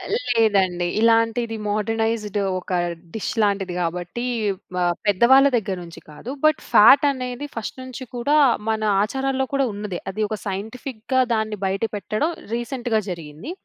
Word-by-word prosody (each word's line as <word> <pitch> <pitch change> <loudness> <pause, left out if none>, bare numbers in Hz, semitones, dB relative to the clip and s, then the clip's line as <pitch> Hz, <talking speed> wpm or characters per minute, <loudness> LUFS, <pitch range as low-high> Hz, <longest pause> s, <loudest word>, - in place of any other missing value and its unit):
లేదండి. 205 - +2
ఇలాంటిది 230 0 +2
మోడ్రనైజ్డ్ 215 0 -1 0.2
ఒక 185 - -6 0.4
డిష్ 220 - -3
లాంటిది 200 -3 0
గాబట్టి, 175 +7 -3 0.5
వ - - -3 0.3
పెద్దవాళ్ళ 240 +7 +6
దగ్గర 200 -4 -1
నుంచి 170 -1 -11
కాదు. 150 +10 -10
బట్, 310 -1 +4
ఫాటనేది 255 +2 +5
ఫస్ట్ 230 +2 -5
నుంచి 255 0 -8
కూడా, 245 +5 +1 0.3
మన 220 0 0 0.2
ఆచారాల్లో 265 +3 -1
కూడా 275 -1 +2
ఉన్నదె. 200 -3 -5
అది 215 +3 -4
ఒక 215 - -3
సైంటిఫిక్‌గా 225 +5 -2
దాన్ని 215 -1 -1
బయట 190 +1 -1
పెట్టడం 215 - -1 0.2
రీసెంట్‌గా 240 -1 -1
జరిగింది. 165 - -7
220 Hz, 130 wpm, -22 LUFS, 200-250 Hz, 0.5 s, పెద్దవాళ్ళ